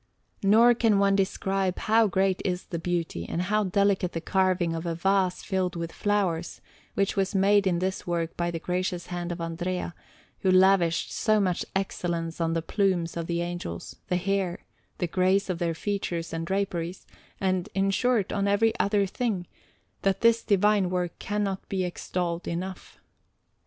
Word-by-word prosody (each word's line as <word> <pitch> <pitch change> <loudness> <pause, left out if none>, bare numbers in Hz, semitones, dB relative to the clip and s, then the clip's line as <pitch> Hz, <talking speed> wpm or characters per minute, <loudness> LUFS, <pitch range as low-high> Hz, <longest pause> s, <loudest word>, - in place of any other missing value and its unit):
Nor 225 +5 +6
can 225 -3 +3
one 195 0 +3
describe 195 -1 0
how 225 0 +3
great 190 0 +1
is 180 -1 -1
the 170 - -4
beauty 165 - -2
and - - -2
how 210 +4 +1
delicate 195 -1 +1
the 165 - -2
carving 185 -1 +1
of 165 +1 -4
a 165 - -1
vase 190 +1 +1
filled 185 -3 -1
with 170 -1 -4
flowers, 190 -5 -1 0.4
which 195 0 +1
was 195 0 0
made 200 +1 +4
in 175 -2 +2
this 185 +1 -2
work 170 -1 -1
by 175 0 -1
the 170 - -3
gracious 180 +1 -2
hand 175 0 -3
of 175 - -5
Andrea, 175 +2 -3 0.5
who 190 - +1
lavished 185 -2 +4
so 215 -1 +2
much 185 -3 0
excellence 170 -3 -2
on 165 0 +1
the 165 -1 -1
plumes 185 -4 0
of 165 -1 -3
the 170 0 -1
Angels, 175 - -6
the 180 - +1
hair, 190 -1 -1 0.3
the - - 0
grace 185 +3 +2
of 175 - -4
their 170 -2 0
features 175 -3 -3
and 165 0 -3
draperies, 185 -3 -2 0.3
and, 185 -2 0
in 195 0 +2
short, 235 -1 +1
on 200 0 0
every 220 +3 +3
other 200 0 +2
thing, 195 -2 -2 0.6
that 195 -1 +1
this 230 0 +5
divine 205 -2 +3
work 180 -1 -2
cannot 205 -2 -2
be 190 -1 0
extolled 175 -1 -3
enough. 185 +2 -5
185 Hz, 170 wpm, -27 LUFS, 175-200 Hz, 0.6 s, Nor